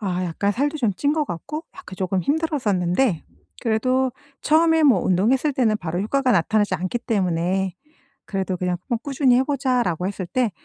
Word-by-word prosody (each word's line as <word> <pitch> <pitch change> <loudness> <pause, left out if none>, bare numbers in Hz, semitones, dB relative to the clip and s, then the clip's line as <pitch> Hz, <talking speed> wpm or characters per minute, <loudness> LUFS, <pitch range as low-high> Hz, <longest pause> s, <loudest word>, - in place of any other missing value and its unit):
아 185 -3 -2
약간 180 +4 -1
살도 290 +6 -1
좀 225 -6 +1
찐 290 +6 +1
것 305 -1 0
같고 285 - -6
약간 185 - -10
조금 185 0 -1
힘들었었는데 245 - 0 0.4
그래도 255 +3 +1 0.3
처음에 320 +1 +3
뭐 255 -10 +5
운동했을 245 - +2
때는 230 -5 +2
바로 175 +1 -3
효과가 260 +5 +1
나타나지 205 +5 +2
않기 185 +7 -2
때문에 185 -4 -1 0.5
그래도 190 -2 -2
그냥 180 -1 -1
어 240 - +1
"꾸준히 265 0 +2
해 260 - +3
보자."라고 250 - 0
했을 195 -2 -4
때 245 0 0
220 Hz, 360 characters per minute, -22 LUFS, 185-270 Hz, 0.5 s, 뭐